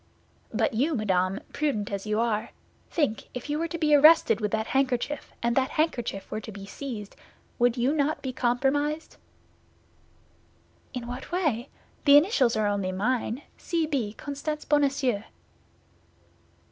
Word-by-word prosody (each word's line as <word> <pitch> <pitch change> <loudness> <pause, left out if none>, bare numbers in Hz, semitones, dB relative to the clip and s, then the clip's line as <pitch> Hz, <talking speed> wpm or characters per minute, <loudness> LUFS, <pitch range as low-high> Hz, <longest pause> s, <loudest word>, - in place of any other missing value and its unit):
"But - - +1
you, 285 +8 +1
madame, 190 -4 0
prudent 245 -10 -1
as 200 +1 -4
you 215 +1 +1
are, 230 -1 0 0.4
think, 285 -10 0
if 250 +4 -5
you 300 - 0
were 335 - 0
to 335 - -4
be 305 -2 +2
arrested 305 -3 +6
with 210 - 0
that 220 +1 -1
handkerchief, 265 +2 -1
and 235 0 +1
that 265 -1 +2
handkerchief 240 -10 -1
were 215 - -3
to 220 - -8
be 200 -1 -9
seized, 215 -2 -7 0.4
would 245 0 +3
you 250 +4 +2
not 305 0 0
be 260 -1 -3
compromised?" 280 +6 0 1.8
"In 245 -1 -4
what 245 +5 -7
way? 295 -9 0 0.4
The 285 -1 +9
initials 290 - +3
are 215 -1 +1
only 200 -2 0
mine—C. 255 - -2
B., 260 -9 -2
Constance 290 +4 -5
Bonacieux." 275 -6 +2
255 Hz, 145 wpm, -27 LUFS, 220-295 Hz, 1.8 s, The